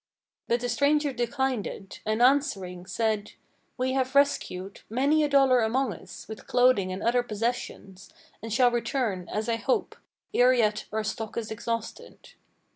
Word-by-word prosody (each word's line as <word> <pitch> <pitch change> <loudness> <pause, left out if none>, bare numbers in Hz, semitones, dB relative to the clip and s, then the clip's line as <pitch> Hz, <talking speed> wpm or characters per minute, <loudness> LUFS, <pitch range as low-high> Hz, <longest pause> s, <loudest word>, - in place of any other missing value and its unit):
But 235 0 +1
the 245 - -1
stranger 285 +3 +2
declined 250 -1 -1
it, 195 - -9
and, 215 +2 +2
answering, 195 - +1
said: 210 +1 -1 0.4
"We 255 +1 0
have 265 0 -1
rescued 200 -9 +1
Many 280 +7 +2
a 295 - +1
dollar 270 -3 +5
among 230 +1 +1
us, 185 - -12
with 220 -1 -9
clothing 245 -7 +3
and 185 +2 -5
other 240 +2 +3
possessions, 215 -4 -4 0.3
And 225 +1 -6
shall 245 +2 +4
return, 230 -6 -2
as 215 +2 -2
I 230 -1 +1
hope, 255 +4 -1 0.4
ere 250 +1 +5
yet 215 -3 +1
our 220 0 -1
stock 220 +1 -4
is 225 -2 -3
exhausted." 230 +1 -6
235 Hz, 155 wpm, -27 LUFS, 210-260 Hz, 0.4 s, dollar